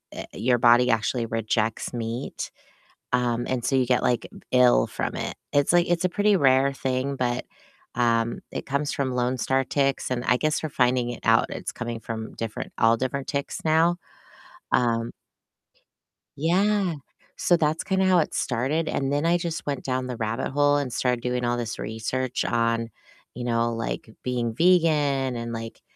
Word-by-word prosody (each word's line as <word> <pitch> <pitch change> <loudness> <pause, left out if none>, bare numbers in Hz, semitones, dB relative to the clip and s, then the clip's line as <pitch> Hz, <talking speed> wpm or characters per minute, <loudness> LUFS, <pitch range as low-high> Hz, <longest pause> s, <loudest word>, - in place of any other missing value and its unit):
uh, - - -5
your 120 +4 +2
body 120 +1 +5
actually 115 +1 +1
rejects 115 0 -1
meat. 115 +2 -4 0.6
Um, 120 -1 +1
and 125 -2 -2
so 135 - +2
you 130 -1 +2
get, 125 0 +2
like, 120 - 0 0.2
ill 125 - +5
from - - -4
it. - - -3 0.2
It's 145 +2 +3
like 175 0 +4
it's 175 +1 +1
a - - +4
pretty 205 +2 +2
rare 135 -3 +4
thing, 135 +1 -2
but, 125 -1 -1 0.5
um, 115 -1 +1
it - - -5
comes 140 +2 -1
from 135 -2 -1
lone 125 +1 0
star 135 +2 +1
ticks, 135 0 0
and 125 -1 -1
I 125 - +4
guess 155 +4 0
we're 155 - -2
finding 125 -3 +1
it 120 - -7
out 115 0 +4
it's - - -5
coming 115 0 -5
from 110 -1 -6
different 115 -2 -5
all 115 +1 +4
different 130 +2 -2
ticks 140 0 -3
now. 165 +2 +3 0.8
Um 115 -1 +2 1.3
Yeah, 185 +4 +2 0.4
so 175 - +3
that's 155 0 0
kinda 190 -1 +1
how 185 -1 +5
it 155 - -1
started, 135 +7 -1
and 135 0 -1
then 145 +2 0
I 170 +1 +4
just 170 -2 -4
went 140 -1 -3
down 130 -1 -2
the 125 -2 -5
rabbit 110 +3 -2
hole 145 +1 +3
and 140 -3 -2
started 125 0 0
doing 125 0 -1
all 120 0 0
this 115 -2 -4
research 120 +3 -2
on, 115 0 0 0.4
you 120 - -6
know, 115 -1 +1
like, 115 0 -4
being 120 -2 -1
vegan 150 -5 +3
and, 115 0 -4
like, 115 0 -7
125 Hz, 175 wpm, -25 LUFS, 115-145 Hz, 1.3 s, body